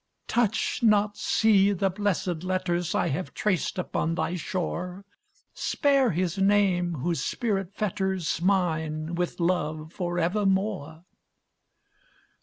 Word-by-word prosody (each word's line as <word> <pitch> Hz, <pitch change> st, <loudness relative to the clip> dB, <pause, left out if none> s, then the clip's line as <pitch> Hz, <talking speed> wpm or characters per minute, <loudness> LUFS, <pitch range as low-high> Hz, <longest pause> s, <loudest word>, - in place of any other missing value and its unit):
Touch 225 Hz, -1 st, 0 dB
not, 210 Hz, -2 st, +3 dB
sea, 205 Hz, -3 st, +3 dB
the 195 Hz, 0 st, 0 dB
blessed 185 Hz, -4 st, -1 dB
letters 180 Hz, -2 st, -1 dB
I -, -, +1 dB
have 165 Hz, +7 st, -4 dB
traced 190 Hz, -4 st, 0 dB
upon 165 Hz, -2 st, -1 dB
thy 175 Hz, -, -1 dB
shore, 180 Hz, +2 st, -4 dB, 0.5 s
Spare 275 Hz, -4 st, +2 dB
his 180 Hz, 0 st, -1 dB
name 190 Hz, -3 st, +3 dB
whose 165 Hz, +4 st, -1 dB
spirit 200 Hz, -5 st, -2 dB
fetters 190 Hz, -5 st, -1 dB
Mine 160 Hz, -4 st, 0 dB
with 175 Hz, +1 st, -2 dB
love 160 Hz, -2 st, -1 dB
forevermore!" 180 Hz, -2 st, -1 dB
185 Hz, 105 wpm, -27 LUFS, 170-205 Hz, 0.5 s, not